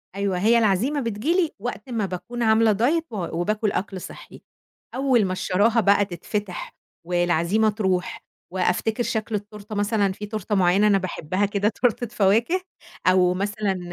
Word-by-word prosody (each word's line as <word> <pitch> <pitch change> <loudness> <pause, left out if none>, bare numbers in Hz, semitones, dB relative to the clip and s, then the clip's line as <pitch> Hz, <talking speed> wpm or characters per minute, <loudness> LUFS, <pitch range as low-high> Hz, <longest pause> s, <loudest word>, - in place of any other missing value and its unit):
أيوة 200 -2 -1
هي 225 +4 +4
العزيمة 230 +7 +2
بتيجي 230 +7 -1
لي 355 -4 +1
وقت 240 +1 -6
ما 225 -4 -1
باكون 230 +6 -5
عاملة 220 0 +4
diet 275 +11 +1
و 170 -2 -3
وباكل 210 +3 0
أكْل 190 -1 -3
صحّي، - - -11 0.5
أول 260 -5 +3
ما 185 - -2
الشراهة 210 +5 +2
بقى 200 0 +4
تتفتِح 190 +1 -5 0.3
والعزيمة 175 +4 +2
ترُوح 190 -4 -2 0.3
وأفتكر 200 +6 0
شكْل 220 -1 -2
التورتة، 210 +1 -7
مثلًا 205 -1 +1
في 205 +2 -7
تورتة 210 -1 -3
معيّنة 190 +3 +4
أنا 200 - +4
باحبها 185 0 -2
كده، 205 +1 0
تورتة 240 +1 0
فواكه 225 - +2 0.5
أو 185 -1 +4
مثلًا 200 0 -2
205 Hz, 150 wpm, -23 LUFS, 190-225 Hz, 0.5 s, هي